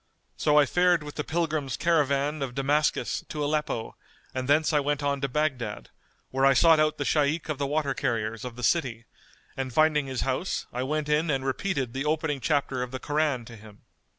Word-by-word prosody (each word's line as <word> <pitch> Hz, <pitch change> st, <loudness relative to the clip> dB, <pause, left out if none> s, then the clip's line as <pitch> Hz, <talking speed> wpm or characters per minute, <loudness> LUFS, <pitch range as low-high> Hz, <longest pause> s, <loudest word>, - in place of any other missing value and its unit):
So 150 Hz, -1 st, +2 dB
I 150 Hz, -, +7 dB
fared 180 Hz, +1 st, +2 dB
with 145 Hz, 0 st, -8 dB
the 150 Hz, -, -3 dB
pilgrims 155 Hz, -6 st, -1 dB
caravan 150 Hz, -2 st, +1 dB
of 130 Hz, -3 st, -4 dB
Damascus 145 Hz, +3 st, 0 dB
to 150 Hz, -1 st, -3 dB
Aleppo 150 Hz, -6 st, -2 dB, 0.4 s
and 130 Hz, -1 st, -3 dB
thence 155 Hz, +3 st, +3 dB
I 150 Hz, -, +4 dB
went 145 Hz, 0 st, -1 dB
on 140 Hz, -1 st, 0 dB
to 140 Hz, -, 0 dB
Baghdad, 125 Hz, -, -2 dB, 0.4 s
where 135 Hz, +1 st, 0 dB
I 135 Hz, 0 st, +6 dB
sought 165 Hz, 0 st, +6 dB
out 155 Hz, 0 st, +2 dB
the 145 Hz, -, -2 dB
Shaykh 150 Hz, +3 st, +1 dB
of 150 Hz, -3 st, -2 dB
the 140 Hz, -, 0 dB
Water 145 Hz, -1 st, 0 dB
carriers 115 Hz, -4 st, -2 dB
of 125 Hz, -2 st, -6 dB
the 125 Hz, -, -8 dB
city 120 Hz, -7 st, 0 dB, 0.5 s
and 130 Hz, -1 st, -3 dB
finding 150 Hz, 0 st, +3 dB
his 130 Hz, -2 st, -3 dB
house 135 Hz, +8 st, -2 dB
I 125 Hz, -, -2 dB
went 150 Hz, +3 st, -1 dB
in 150 Hz, +2 st, +1 dB
and 135 Hz, -2 st, 0 dB
repeated 135 Hz, -3 st, -2 dB
the 135 Hz, +2 st, -3 dB
opening 150 Hz, -2 st, -1 dB
chapter 135 Hz, 0 st, 0 dB
of 125 Hz, -, -3 dB
the 130 Hz, -, -5 dB
Koran 145 Hz, -4 st, 0 dB
to 115 Hz, -, -11 dB
him. 105 Hz, -1 st, -15 dB
145 Hz, 205 wpm, -27 LUFS, 130-155 Hz, 0.5 s, I